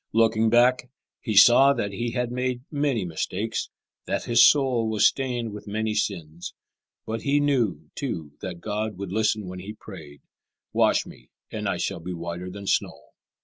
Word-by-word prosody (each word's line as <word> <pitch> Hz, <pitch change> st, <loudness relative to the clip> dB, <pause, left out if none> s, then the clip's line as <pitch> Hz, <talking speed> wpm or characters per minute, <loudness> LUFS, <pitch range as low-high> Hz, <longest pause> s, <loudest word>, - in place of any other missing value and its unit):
Looking 110 Hz, 0 st, +3 dB
back, 125 Hz, +2 st, +3 dB, 0.3 s
he 110 Hz, -4 st, -3 dB
saw 135 Hz, +7 st, +7 dB
that 100 Hz, -6 st, -3 dB
he 120 Hz, +4 st, -3 dB
had 125 Hz, -1 st, -1 dB
made 125 Hz, 0 st, -2 dB
many 140 Hz, -9 st, 0 dB
mistakes, 95 Hz, +6 st, -3 dB, 0.4 s
that -, -, -2 dB
his 120 Hz, 0 st, +5 dB
soul 130 Hz, -6 st, +4 dB
was 110 Hz, -2 st, +2 dB
stained 120 Hz, -5 st, 0 dB
with 105 Hz, 0 st, -9 dB
many 110 Hz, +1 st, -2 dB
sins; 85 Hz, -5 st, -4 dB, 0.5 s
but 115 Hz, +1 st, -4 dB
he 145 Hz, +1 st, +2 dB
knew, 115 Hz, -, 0 dB
too, 85 Hz, -, -5 dB
that 90 Hz, -2 st, -6 dB
God 105 Hz, -1 st, -3 dB
would 100 Hz, -1 st, -6 dB
listen 110 Hz, 0 st, 0 dB
when 90 Hz, 0 st, -7 dB
he 100 Hz, +4 st, -7 dB
prayed, 80 Hz, -10 st, -12 dB, 0.5 s
"Wash -, -, +3 dB
me, -, -, -15 dB, 0.2 s
and -, -, -3 dB
I -, -, -1 dB
shall -, -, -3 dB
be 90 Hz, +2 st, -6 dB
whiter 85 Hz, +1 st, -6 dB
than 100 Hz, +2 st, -9 dB
snow." -, -, 0 dB
110 Hz, 170 wpm, -25 LUFS, 95-120 Hz, 0.5 s, saw